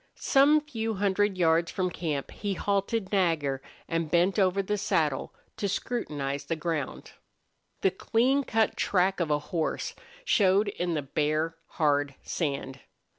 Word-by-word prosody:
Some 290 +3 +4
few 225 -7 -3
hundred 200 0 +1
yards 170 -1 +3
from 185 -2 -1
camp 150 -5 -3
he 200 -2 -3
halted 200 +1 -1
Nagger 160 -9 +1 0.3
and 165 -2 -1
bent 180 +5 +3
over 190 0 +3
in - - -10
the 210 - 0
saddle 155 -8 0 0.3
to 200 - -1
scrutinize 145 - -3
the 165 - -1
ground. 160 -4 -3 0.7
The 190 - +3
clean 250 +8 +2
cut 225 -3 +1
track 190 0 +1
of 170 -3 0
a 150 - +3 0.2
horse 160 -2 -1 0.3
showed 200 - +3
in 175 -3 -2
the 150 - -1
bare, 155 +3 0
hard 145 -3 +1
sand. 140 -4 -3
180 Hz, 145 wpm, -28 LUFS, 155-205 Hz, 0.7 s, Some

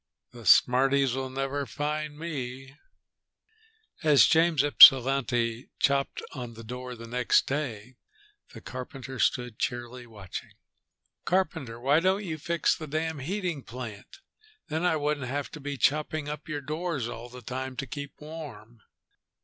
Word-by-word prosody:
"The 120 -3 -10
smarties'll 135 0 +4
never 135 +1 -3
find 150 +3 -3
me." 135 -4 -6 1.3
As 150 -3 +6
James 160 -3 +4
Ypsilanti 130 -4 +6
chopped 140 -1 +1
on 120 -4 -7
the 115 - -10
door 125 +2 -7
next 120 +2 +1
day, 130 -4 -4 0.5
the - - -11
carpenter 130 0 -8
stood 125 -3 0
cheerily 120 0 -4
watching. 105 -5 -9 0.7
"Carpenter, 160 -11 -1
why 140 +5 +3
don't 190 +4 +1
you 160 -3 -4
fix 170 +2 +1
the 155 - -8
damn 160 +1 -2
heating 175 0 -3
plant? 120 - -9 0.5
Then 160 +2 -2
I 175 - +3
wouldn't 145 -3 -1
have 140 +2 -3
to 155 - -9
be 145 -1 -5
chopping 150 +2 0
up 150 +1 -6
your 150 -1 -3
doors 155 -3 -3
all 120 +1 -8
the 125 0 -11
time 130 +2 -5
to 135 - -4
keep 140 0 -8
warm." 140 -8 -10
135 Hz, 135 wpm, -28 LUFS, 125-150 Hz, 1.3 s, As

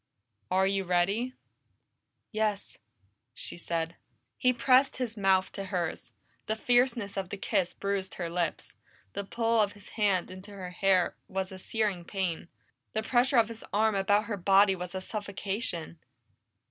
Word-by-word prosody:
"Are 190 +1 +3
you 195 0 +1
ready?" 195 +8 +1 1.0
"Yes," 215 -2 -1 0.6
she - - -3
said. 170 -1 -3 0.4
He 250 - +3
pressed 255 +2 +4
his 245 -3 -2
mouth 190 -2 +3
to 195 - -5
hers. 175 -9 -3 0.4
The 220 - 0
fierceness 240 -3 +2
of 190 -2 -2
the 205 - -5
kiss 185 -2 0
bruised 200 -1 -2
her 175 - -3
lips, 170 -1 -2 0.4
the - - -3
pull 230 +2 +2
of 205 -1 +1
his 205 -2 -15
hand 200 -5 +1
in 185 0 -8
her 195 -3 -8
hair 185 -1 +2
was 190 0 -3
a 190 - -8
searing 205 -3 -1
pain, 175 -3 -2 0.5
the 220 - -1
pressure 250 +3 +3
of 230 -2 +6
his 225 -1 -9
arm 215 +1 +3
about 205 +2 +3
her 215 -3 -3
body 195 +1 +5
was 180 0 -6
a 190 - -2
suffocation. 195 -4 -3
200 Hz, 155 wpm, -30 LUFS, 185-220 Hz, 1.0 s, of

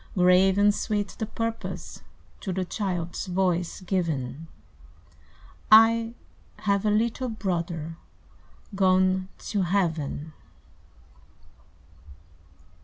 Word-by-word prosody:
Grave 180 +1 +5
and 205 0 +5
sweet 205 -1 -2
the 220 - -2
purpose 225 +1 -5 0.4
To 195 - -4
the 185 0 -2
child's 180 -2 -3
voice 180 -1 0
given: 160 -6 -2 1.2
"I 225 +1 +6 0.5
have 200 0 +1
a - - +4
little 230 +4 0
brother 170 -6 -3 0.8
Gone 185 -1 +2
to 205 -2 -2
Heaven!" 160 -5 -1
190 Hz, 85 wpm, -26 LUFS, 175-210 Hz, 1.2 s, I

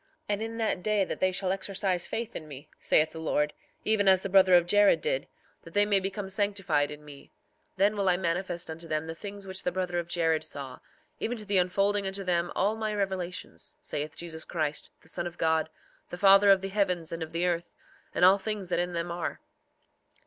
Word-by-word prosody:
4:7 - - -39 0.2
And 205 0 0
in 225 +1 -4
that 220 -5 0
day 210 0 +2
that - - -5
they 185 - +2
shall 185 0 -1
exercise 190 -2 -1
faith 230 0 -4
in 155 - -6
me, 145 0 -10
saith 155 0 +3
the 160 - -8
Lord, 150 -2 0 0.3
even 215 -2 +2
as 190 -1 +5
the 195 - -3
brother 190 -1 +6
of 175 -1 +5
Jared 205 +3 +5
did, - - -1 0.3
that - - -14
they 205 0 +5
may 205 -1 +3
become 195 +1 -4
sanctified 195 -7 0
in 150 0 -9
me, 145 -2 -13 0.5
then 200 +2 +3
will 200 -2 +1
I 180 - +3
manifest 175 -1 -2
unto 165 +1 -8
them 155 0 -1
the 160 - -5
things 200 +3 -8
which 190 0 -4
the 180 - -1
brother 180 -1 -1
of 170 - -4
Jared 165 -2 +1
saw, 135 -3 -7 0.4
even 245 +2 -2
to 215 - -6
the 200 -2 +3
unfolding 195 +2 +1
unto 195 +1 -3
them 175 -1 0
all 205 +3 +2
my 215 -1 -2
revelations, 190 -3 -4
saith 150 +1 -4
Jesus 160 -2 -5
Christ, 155 -3 -3
the - - -20
Son 175 +1 -2
of 175 - -9
God, 160 -1 +1 0.4
the 175 - -6
Father 195 +1 +7
of 195 -1 +6
the 195 - -4
heavens 185 -5 0
and 165 0 -5
of 160 0 -5
the 170 +2 0
earth, 175 -1 -2 0.4
and 180 - +5
all 190 +2 +7
things 205 -2 -4
that - - +1
in 175 0 -1
them 170 0 -2
are. 170 -1 -3
185 Hz, 220 wpm, -28 LUFS, 165-200 Hz, 0.5 s, Father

